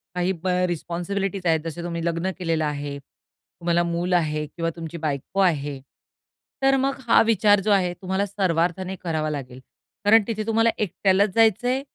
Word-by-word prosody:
काही 180 Hz, +1 st, +1 dB
अ, -, -, +2 dB, 0.2 s
रिस्पॉन्सिबिलिटीज 180 Hz, +3 st, -3 dB
आहेत, 160 Hz, -1 st, +3 dB
जसे 165 Hz, +1 st, -5 dB
तुम्ही 170 Hz, -1 st, -4 dB
लग्न 170 Hz, +2 st, -1 dB
केलेलं 165 Hz, -3 st, 0 dB
आहे, 145 Hz, -1 st, -4 dB
तुम्हाला 170 Hz, +4 st, -4 dB
मूल 170 Hz, +1 st, -1 dB
आहे 155 Hz, -3 st, +1 dB
किंवा 165 Hz, +2 st, -3 dB
तुमची 165 Hz, 0 st, -7 dB
बायको 140 Hz, +6 st, -3 dB
आहे. 145 Hz, -6 st, +1 dB, 0.8 s
तर 270 Hz, 0 st, +4 dB
मग 275 Hz, -, -1 dB
हा -, -, +6 dB
विचार 210 Hz, -2 st, +4 dB
जो -, -, +4 dB
आहे 185 Hz, -3 st, +2 dB
तुम्हाला 190 Hz, +1 st, -1 dB
सर्वार्थाने 185 Hz, -1 st, -1 dB
करावा 160 Hz, -3 st, -1 dB
लागेल. 130 Hz, -4 st, -6 dB, 0.5 s
कारण 220 Hz, +1 st, +6 dB
तिथे 215 Hz, -2 st, -3 dB
तुम्हाला 225 Hz, +1 st, +3 dB
एकट्यालाच 200 Hz, 0 st, +2 dB
जायचंय 230 Hz, +4 st, +3 dB
175 Hz, 155 wpm, -24 LUFS, 165-200 Hz, 0.8 s, हा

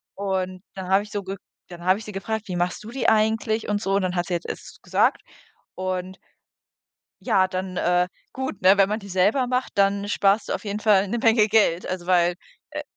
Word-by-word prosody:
Und 185 Hz, -2 st, -2 dB
dann 190 Hz, -1 st, -6 dB
habe 195 Hz, +2 st, +4 dB
ich 210 Hz, -, -13 dB
so 205 Hz, -, -2 dB
ge 190 Hz, +1 st, -5 dB, 0.3 s
dann 175 Hz, -1 st, -10 dB
habe 185 Hz, +3 st, +3 dB
ich 220 Hz, -, -10 dB
sie 210 Hz, -, -7 dB
gefragt: 220 Hz, +3 st, -4 dB
„Wie 180 Hz, -, -4 dB
machst 175 Hz, +4 st, -2 dB
du 220 Hz, -, -9 dB
die 260 Hz, 0 st, +1 dB
eigentlich 220 Hz, 0 st, +1 dB
und 205 Hz, 0 st, 0 dB
so?“ 195 Hz, -1 st, 0 dB
Und 200 Hz, -, +1 dB
dann 180 Hz, 0 st, -1 dB
hat 175 Hz, -1 st, -1 dB
sie 180 Hz, -, -1 dB
es 170 Hz, -, -3 dB
jetzt -, -, -8 dB
gesagt. -, -, +2 dB, 0.5 s
Und 185 Hz, 0 st, -4 dB, 1.0 s
ja, 185 Hz, -1 st, +2 dB
dann 185 Hz, 0 st, -4 dB
äh, 180 Hz, 0 st, +2 dB, 0.2 s
gut, 265 Hz, -5 st, -5 dB
ne, 190 Hz, +2 st, +6 dB
wenn 195 Hz, -1 st, +4 dB
man 215 Hz, -, -1 dB
die 200 Hz, -, -11 dB
selber 205 Hz, +8 st, +2 dB
macht, 250 Hz, +1 st, -1 dB
dann 200 Hz, 0 st, +2 dB
sparst 200 Hz, +1 st, +2 dB
du -, -, +1 dB
auf -, -, -5 dB
jeden 205 Hz, +1 st, -3 dB
Fall 205 Hz, -2 st, +4 dB
'ne 235 Hz, -, -1 dB
Menge 225 Hz, -2 st, +4 dB
Geld. 205 Hz, -5 st, +2 dB
Also, 185 Hz, -1 st, -4 dB
weil, 175 Hz, -1 st, +3 dB, 0.4 s
äh -, -, -5 dB
195 Hz, 220 wpm, -24 LUFS, 185-215 Hz, 1.0 s, ne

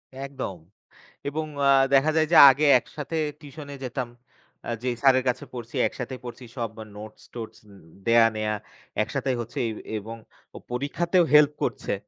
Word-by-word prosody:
একদম। 135 Hz, -8 st, -5 dB, 0.7 s
এবং 155 Hz, +2 st, -2 dB, 0.2 s
আ -, -, +6 dB, 0.2 s
দেখা 140 Hz, +3 st, +5 dB
যায় 155 Hz, 0 st, +3 dB
যে -, -, +7 dB
আগে 140 Hz, +4 st, +2 dB
একসাথে 150 Hz, +4 st, -7 dB, 0.2 s
টিউশনে 145 Hz, -1 st, -10 dB
যেতাম। 125 Hz, 0 st, -3 dB, 0.6 s
আ -, -, -4 dB
যেই 125 Hz, -1 st, -1 dB
স্যারের 130 Hz, -2 st, +5 dB
কাছে 125 Hz, +2 st, -2 dB
পড়ছি 120 Hz, -2 st, -8 dB
একসাথে 130 Hz, 0 st, -6 dB
পড়ছি 120 Hz, +1 st, -9 dB
সব 115 Hz, -2 st, -2 dB, 0.3 s
নোটস-টোটস 110 Hz, +2 st, -10 dB, 0.5 s
দেয়া 115 Hz, 0 st, +6 dB
নেয়া 110 Hz, 0 st, -1 dB, 0.5 s
একসাথেই 130 Hz, -2 st, -2 dB
হচ্ছে 120 Hz, +5 st, -6 dB
এ -, -, -2 dB, 0.3 s
এবং 110 Hz, +2 st, -7 dB, 0.4 s
ও -, -, -6 dB
পরীক্ষাতেও 170 Hz, +8 st, +1 dB
হেল্প 150 Hz, -1 st, +7 dB
করছে। -, -, -2 dB
130 Hz, 145 wpm, -25 LUFS, 115-145 Hz, 0.7 s, যে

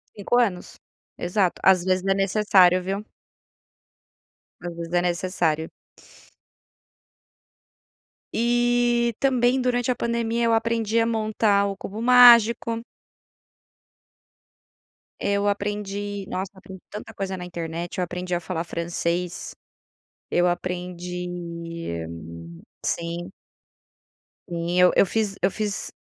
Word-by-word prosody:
5 210 Hz, +4 st, 0 dB
anos. 195 Hz, -7 st, -1 dB, 0.4 s
Exato, 180 Hz, +1 st, 0 dB
às 185 Hz, -2 st, +5 dB
vezes 185 Hz, 0 st, 0 dB
é 195 Hz, -, +3 dB
necessário, 190 Hz, -2 st, +4 dB
viu. 195 Hz, +3 st, -4 dB, 1.5 s
Às 175 Hz, -1 st, -6 dB
vezes 170 Hz, 0 st, -7 dB
é 175 Hz, -, +3 dB
necessário. 175 Hz, -3 st, 0 dB, 2.6 s
E 240 Hz, 0 st, +2 dB
também 255 Hz, -1 st, +2 dB
durante 245 Hz, -1 st, 0 dB
a 250 Hz, -, +2 dB
pandemia 235 Hz, 0 st, -1 dB
eu 230 Hz, -, +3 dB
aprendi 225 Hz, 0 st, +1 dB
a 225 Hz, -, +3 dB
montar 215 Hz, -2 st, +1 dB
o 195 Hz, -, -4 dB
cubo 210 Hz, +3 st, -7 dB
mágico 235 Hz, -2 st, +6 dB, 2.4 s
eu 200 Hz, 0 st, 0 dB
aprendi, 205 Hz, 0 st, -3 dB
nossa, 190 Hz, +1 st, -3 dB
aprendi 190 Hz, 0 st, -12 dB
tanta 210 Hz, +1 st, -8 dB
coisa 195 Hz, -1 st, -4 dB
na 180 Hz, -, -7 dB
internet, 170 Hz, 0 st, -5 dB
eu 180 Hz, -, +1 dB
aprendi 180 Hz, 0 st, -3 dB
a -, -, -1 dB
falar 170 Hz, -1 st, -3 dB
francês. 170 Hz, +1 st, -3 dB, 0.8 s
Eu 175 Hz, 0 st, +3 dB
aprendi 180 Hz, 0 st, -3 dB, 1.6 s
sim. 170 Hz, +2 st, -3 dB, 1.2 s
Sim, 170 Hz, +1 st, -2 dB
eu 180 Hz, 0 st, +7 dB
eu -, -, +6 dB
fiz 210 Hz, +1 st, -1 dB
eu 190 Hz, -, +2 dB
fiz 210 Hz, -1 st, -3 dB
195 Hz, 105 wpm, -24 LUFS, 180-225 Hz, 2.6 s, eu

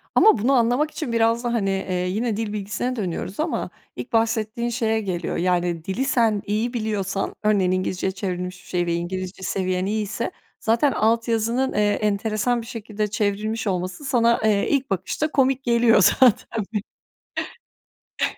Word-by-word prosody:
Ama 435 Hz, -, +6 dB
bunu 240 Hz, +6 st, +2 dB
anlamak 250 Hz, +5 st, +2 dB
için 285 Hz, -7 st, -4 dB
biraz 230 Hz, +1 st, +2 dB
da, 240 Hz, -1 st, -1 dB
hani, 205 Hz, -4 st, +1 dB
eee, 190 Hz, -1 st, -2 dB, 0.2 s
yine 215 Hz, +3 st, -1 dB
dil 220 Hz, -2 st, -3 dB
bilgisine 210 Hz, +5 st, -2 dB
dönüyoruz 190 Hz, -2 st, -4 dB
ama 315 Hz, +2 st, -1 dB, 0.3 s
ilk -, -, -7 dB
bahsettiğin 225 Hz, +1 st, +1 dB
şeye 225 Hz, -2 st, 0 dB
geliyor, 180 Hz, -4 st, -3 dB
yani, 175 Hz, -2 st, 0 dB
dili 220 Hz, +8 st, -1 dB
sen 230 Hz, -6 st, +2 dB
iyi 220 Hz, +4 st, -1 dB
biliyorsan, 205 Hz, -4 st, -2 dB
örneğin, 200 Hz, -4 st, +3 dB
İngilizceye 185 Hz, 0 st, -1 dB
çevrilmiş 185 Hz, -1 st, -4 dB
bir -, -, -19 dB
şey 175 Hz, -1 st, 0 dB
ve 170 Hz, -, 0 dB
İngilizce 185 Hz, +2 st, -4 dB
seviyen 185 Hz, -1 st, -1 dB
iyiyse 215 Hz, +2 st, -2 dB, 0.3 s
zaten 230 Hz, +6 st, +2 dB
alt 230 Hz, +1 st, +1 dB
yazının, 230 Hz, +3 st, +1 dB
eee, -, -, 0 dB
enteresan 215 Hz, +3 st, 0 dB
bir 230 Hz, -, -11 dB
şekilde 215 Hz, -2 st, -3 dB
çevrilmiş 210 Hz, +2 st, -1 dB
olması 185 Hz, +6 st, -2 dB
sana, 235 Hz, -3 st, +3 dB
eee, 210 Hz, -2 st, +2 dB
ilk 275 Hz, -2 st, +1 dB
bakışta 195 Hz, -, -1 dB
komik 270 Hz, -1 st, +2 dB
geliyor 235 Hz, -3 st, +4 dB, 0.2 s
zaten, 230 Hz, -3 st, +3 dB, 1.6 s
bir -, -, 0 dB
215 Hz, 155 wpm, -23 LUFS, 190-235 Hz, 1.6 s, Ama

